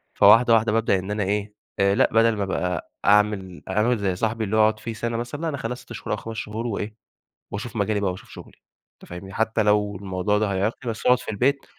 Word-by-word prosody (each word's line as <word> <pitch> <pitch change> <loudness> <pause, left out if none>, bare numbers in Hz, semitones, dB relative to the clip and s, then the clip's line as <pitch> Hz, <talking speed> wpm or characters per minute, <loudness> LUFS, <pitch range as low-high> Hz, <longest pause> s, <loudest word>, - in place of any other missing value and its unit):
فواحدة 115 +3 +6
واحدة 110 -1 +3
بابدأ 110 -4 +2
إن 95 +3 -6
أنا 105 -1 -1
إيه، 105 +1 -2 0.3
آآ 100 0 +3
لأ 130 - +3
بدل 115 0 +4
ما 100 - -1
ابقى 90 -2 -2
أعمل 100 -3 +2
أعمل 110 +5 +2
زي 100 -3 -1
صاحبي 110 +4 -1
اللي 110 +1 -1
هو - - +6
أقعد 110 0 +3
فيه 115 +1 -5
سنة 115 +1 -3
مثلًا، 120 +6 -5
لأ 165 - -1
أنا 140 - -3
اخلّيها 120 -1 -3
6 125 -1 -12
شهور 105 - -6
أو - - -1
5 115 0 -7
شهور 110 +3 -4
وإيه، 105 0 -4 0.6
وأشوف 110 +4 -6
مجالي 105 -1 0
بقى 100 -2 0
وأشوف 90 - -11
شغلي، - - -13 0.4
أنت - - -17
فاهمني، 90 +2 -8
حتّى 110 0 +1
لو 105 -1 +2
الموضوع 95 +1 -1
ده 105 -2 0
هيعيقني 110 +5 -1
بس 110 - -8
أقعد 125 0 +5
في - - -6
البيت، 135 +7 +1
105 Hz, 235 wpm, -24 LUFS, 100-115 Hz, 0.6 s, فواحدة